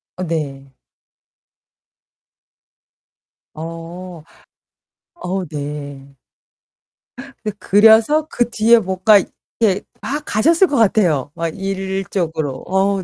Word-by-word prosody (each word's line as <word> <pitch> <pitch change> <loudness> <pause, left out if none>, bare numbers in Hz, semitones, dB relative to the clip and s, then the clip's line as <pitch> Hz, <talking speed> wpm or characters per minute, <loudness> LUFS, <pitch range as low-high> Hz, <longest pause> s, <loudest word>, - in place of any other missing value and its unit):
어 185 - -5
네. 140 -5 -4 2.8
어. 165 +1 -8 0.9
어 190 - -4
네. 140 -2 -7 1.3
그 215 - -2
그려서 225 +9 +4
그 240 -1 0
뒤에 230 +1 +4
뭔가 190 +2 +4 0.4
이렇게 205 -3 +2 0.2
막 295 +2 -3
가셨을 330 - +3
것 290 - -2
같아요, 180 - +2
막 165 0 -2
일적으로. 190 -6 -3
어 195 +1 +1
190 Hz, 145 characters per minute, -18 LUFS, 160-215 Hz, 2.8 s, 그려서